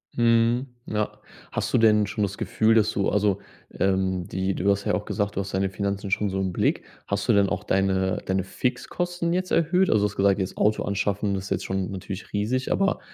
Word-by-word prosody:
Mhm. 115 +2 +3 0.2
Ja. 105 -1 -1 0.4
Hast - - -2
du - - +5
denn 105 -2 +5
schon 105 +1 -2
das 100 +1 -2
Gefühl, 110 0 +2
dass 110 -1 +4
du 100 - 0
also, 100 -1 +1 0.4
ähm, 95 -2 +1
die 95 +1 -1
du 100 +3 0
hast 100 0 +1
ja - - +1
auch 105 - -1
gesagt, 100 -1 -2
du - - -1
hast 95 0 -4
deine 95 0 +1
Finanzen 100 0 -3
schon 105 0 +1
so 95 - -2
im 95 -1 -1
Blick. - - +1 0.2
Hast 100 0 -2
du 115 - +5
denn 100 -1 +4
auch 95 - -2
deine 95 -1 +1
deine 95 -1 0
Fixkosten 170 - -2
jetzt 185 0 -1
erhöht? 180 +3 +3
Also, 105 - +3
du 105 - +2
hast - - -12
gesagt, 100 0 +3
jetzt 95 -1 -3
Auto 105 +1 +2
anschaffen 100 0 -1
ist 95 +1 -5
jetzt - - -1
schon 95 -1 -2
natürlich 95 0 -7
riesig, 115 +6 -1
aber 195 0 +1
100 Hz, 220 wpm, -25 LUFS, 95-115 Hz, 0.4 s, du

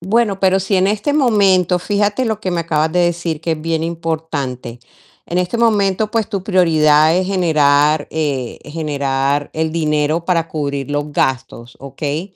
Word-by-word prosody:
Bueno, 200 +2 0
pero 190 0 +2
si 195 +1 0
en 185 +1 +3
este 215 +8 0
momento, 195 - +3
fíjate 205 +6 0
lo 220 -2 -2
que 190 - -3
me 175 -1 -1
acabas 155 -1 0
de 180 - +2
decir, 170 -2 -1
que 165 0 -1
es 155 - -5
bien 160 0 -2
importante. 160 -7 -4 0.5
En 175 - -2
este 180 +5 -1
momento, 215 -3 +1
pues, 225 -2 -1
tu 200 -4 -3
prioridad 160 -5 +3
es 185 0 0
generar, 150 -5 +2
eh, 140 -6 -3
generar 145 -2 -2
el 160 0 -1
dinero 155 0 0
para 170 -2 0
cubrir 140 -3 -4
los 145 +1 -2
gastos, 125 -3 -2
¿okey? 145 +7 -5
165 Hz, 165 wpm, -17 LUFS, 150-190 Hz, 0.5 s, en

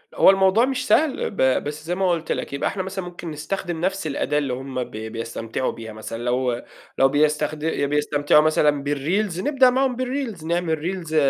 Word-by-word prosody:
هو - - +7
الموضوع 195 +4 +5
مش 260 -1 -2
سهل 305 -3 +2
ب 130 -9 +2
بس 150 +1 -6
زي 175 +2 -1
ما 190 0 +1
قُلت 165 -1 -2
لك - - -3
يبقى 140 - 0
احنا 190 - -3
مثلًا 190 0 -5
ممكن 175 -2 -7
نستخدم 165 +2 -4
نفس 190 -1 -1
الأداة 145 0 -1
اللي 140 -4 0
هُم 130 0 -4
ب - - -11
بيستمتعوا 115 +2 -4
بيها. 110 -1 -9
مثلًا، 115 +2 -6
لو 125 0 0 0.4
لو 135 - +6
بيستخد 150 +1 +1
بيستمتعوا 145 -1 +2
مثلًا 150 -2 +2
بالريلز، 165 +7 -1
نبدأ 265 +2 +4
معاهم 260 0 +1
بالريلز. 250 - -3
نعمل 170 -1 0
ريلز 170 -1 -4
155 Hz, 180 wpm, -23 LUFS, 140-190 Hz, 0.4 s, هو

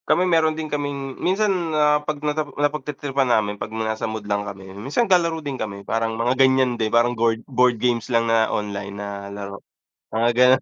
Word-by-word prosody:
Kami 180 - +4
meron 160 -3 +2
din 160 - -3
kaming 140 -2 -3
minsan 200 +3 +2 0.2
na 150 -1 +3
'pag 150 0 -3
napa 150 0 -1
napagtritripan 145 -2 -1
namin 105 -3 +1
'pag - - -3
nasa 110 0 -2
mood 110 -1 -5
lang 100 0 0
kami, 95 -1 -10
minsan 135 - -1
naglalaro 170 -5 +2
din 135 -3 -4
kami 100 -2 -5
parang 115 +1 -1
mga 120 +2 +1
ganiyan 130 -1 +4
din 110 -1 +1
parang 120 +2 +3
goard 115 -1 0
board 125 -2 +2
games 120 0 0
lang 115 -1 +2
na 115 -1 +3
online 100 -1 -3
na 100 -1 -6
laro, 100 -1 -7 0.5
mga 115 +1 +3
ganun. 125 +2 +5
120 Hz, 190 wpm, -22 LUFS, 110-145 Hz, 0.5 s, ganun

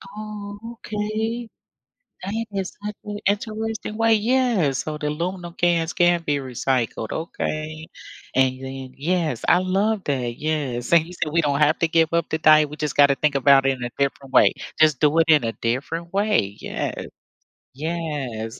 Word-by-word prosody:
Oh, 210 -1 -7 0.3
okay. 220 +3 -3 0.8
That 220 +4 -3
is 195 -2 -3
such 210 0 -4
a 205 0 -4
interesting 215 +1 -2
way. 225 0 +4
Yes, 220 - +2
so 155 -1 -4
the 150 - -2
aluminum 175 +3 -4
cans 170 -1 +1
can 175 -1 +3
be 150 -3 0
recycled. 125 -4 -2
Okay, 155 -1 -4 0.5
and 130 0 +2
then 130 -1 -7
yes, 160 -3 -1
I - - +6
love 195 +3 0
that. 125 -4 -2
Yes, 145 -4 -2
and 165 -2 +6
you 175 - -11
said 165 -3 -3
we 170 - +4
don't 145 -2 0
have 150 +1 +3
to 165 - +2
give 160 0 +3
up 170 -1 +1
the 160 - 0
diet, 155 -1 +5
we 150 - -8
just 150 -3 -3
gotta 140 -1 +5
think 150 +1 +1
about 135 0 +5
it 135 - +4
in 125 - -8
a 120 - -3
different 140 -1 -2
way. - - +6 0.3
Just 155 -4 +4
do 150 +1 +3
it 165 - +5
in 155 -4 +6
a 115 -1 -2
different 160 +9 -2
way. 195 - +1
Yes, - - -4 0.7
yes. 140 -7 -4
155 Hz, 175 wpm, -23 LUFS, 140-195 Hz, 0.8 s, I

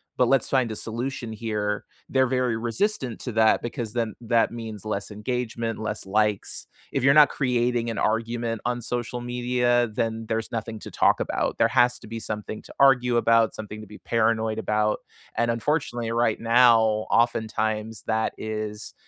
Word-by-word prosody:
but 125 - +3
let's 135 -3 +3
find 130 -4 +1
a - - -4
solution 115 +1 -4
here." 105 -2 -2 0.2
They're 130 -1 +2
very 125 -2 0
resistant 120 - -1
to 125 - -4
that 110 0 +4
because 120 -2 -4
then 115 -3 -1
that 115 0 +2
means 110 -3 -7
less 105 -2 -3
engagement, 115 +1 -3
less 110 -2 -4
likes, 105 0 0 0.3
if 135 - 0
you're 135 +1 +6
not 150 -1 +8
creating 120 -3 0
an 115 - -4
argument 115 +1 -1
on 120 0 -1
social 120 +1 -3
media 120 0 +1
then, 115 0 -2
there's 110 0 -2
nothing 115 -1 -4
to - - -9
talk - - +3
about. - - -1
There - - +4
has 125 -1 +3
to - - -13
be 115 +1 -5
something 105 0 -5
to - - -14
argue 125 -3 +5
about, 115 -1 +3
something 110 0 -7
to 105 - -11
be 105 - -11
paranoid 110 -1 0
about. 105 -1 0 0.4
And, 120 0 +1
unfortunately, 120 -2 -1
right 115 -1 +1
now, 115 +1 +6 0.3
oftentimes, 110 -1 0
that 110 0 0
is 110 -1 -5
115 Hz, 170 wpm, -25 LUFS, 110-120 Hz, 0.4 s, not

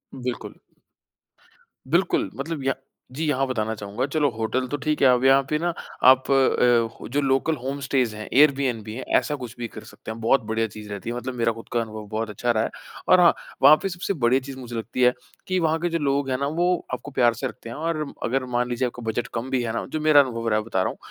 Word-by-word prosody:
बिल्कुल। 125 -1 -5 1.4
बिल्कुल 175 - +2
मतलब 145 0 -4
या 135 0 +1 0.4
जी। 155 +5 -3
यहाँ 135 -2 +1
बताना 110 -3 -1
चाहूँगा 105 +5 -3
चलो 145 -1 +1
होटल 115 +3 -2
तो 145 - -3
ठीक 155 -1 0
है 135 - +7
अब 125 0 +4
यहाँ 135 +1 +6
पे 150 - +1
ना 175 0 -1 0.4
आप 130 +1 +1
अ, 120 -3 +2
जो 145 +1 +1
लोकल 135 +4 +1
होम 140 +2 -3
स्टेस 130 -5 0
हैं 105 0 -7
एयर 145 +2 +7
बीएनबी 125 -5 -1
भी 110 0 -7
है 130 - -5
ऐसा 150 - -1
कुछ 125 -3 -8
भी 120 -1 -4
कर 110 - -11
सकते - - -10
हैं। 115 - -7
बहुत 115 +4 +3
बढ़िया 115 0 +1
चीज़ 105 0 -11
रहती 100 +3 -5
है। 120 - -3
मतलब 125 +1 -4
मेरा 115 -1 +1
खुद 115 - -11
का 120 - +2
अनुभव 110 -1 -7
बहुत 110 0 -2
अच्छा 120 +3 -1
रहा 110 -1 +1
है - - -2 0.4
और 185 - +6
हाँ 170 -1 +6 0.3
वहाँ 145 +3 +9
पे 195 - 0
सबसे 175 +2 -3
बड़ी 125 +3 +4
चीज़ 135 0 -9
मुझे 120 -2 -7
लगती 115 +3 -4
है 125 0 +5 0.3
कि 185 0 +1
वहाँ 160 -1 +1
के 175 +1 -1
जो 165 0 -1
लोग 140 -1 0
हैं 130 - 0
ना 140 - 0
वो 175 - +3 0.3
आपको 125 +3 -5
प्यार 120 -3 +3
से 115 - -3
रखते 115 - -10
हैं 120 - -7
और 155 -1 -2 0.2
अगर 130 +1 0
मान 125 0 +1
लीजिए 120 +1 0
आपको 120 0 -8
बजट 115 +1 -2
कम 120 +3 -3
भी 130 -2 +1
है 115 -1 -2
ना - - -2
जो - - 0
मेरा 155 -2 +6
अनुभव 115 -3 -3
रहा 105 0 +2
है 110 - -6
बता 95 -5 0
रहा - - 0
हूँ - - -8
130 Hz, 255 wpm, -24 LUFS, 115-140 Hz, 1.4 s, वहाँ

